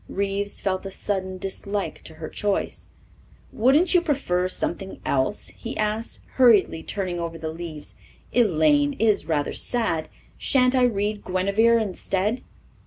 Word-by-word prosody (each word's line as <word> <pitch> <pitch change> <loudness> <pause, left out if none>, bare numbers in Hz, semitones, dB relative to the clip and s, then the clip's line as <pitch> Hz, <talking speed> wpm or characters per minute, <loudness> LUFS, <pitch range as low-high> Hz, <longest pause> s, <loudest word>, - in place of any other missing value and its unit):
Reeves 200 +1 -1
felt 190 -1 -1
a - - -5
sudden 190 -1 -3
dislike 195 +1 -3
to 160 - -12
her 160 0 -6
choice. 205 -1 -2 0.6
"Wouldn't 285 - +3
you 355 - +5
prefer 260 - 0
something 190 +1 -3
else?" 135 +9 0
he 230 - -7
asked, 215 +2 -2 0.2
hurriedly 220 -10 +5
turning 185 -2 -3
over 165 -1 -4
the 160 -1 -4
leaves. 160 -3 -8 0.4
"'Elaine' 155 -10 +3
is 210 -6 +2
rather 150 -3 0
sad. 220 -10 -1 0.3
Shan't 255 -1 +3
I 255 -1 +5
read 210 -2 -1
'Guinevere' 200 +5 +3
instead?" 205 +1 -1
195 Hz, 135 wpm, -24 LUFS, 175-225 Hz, 0.6 s, you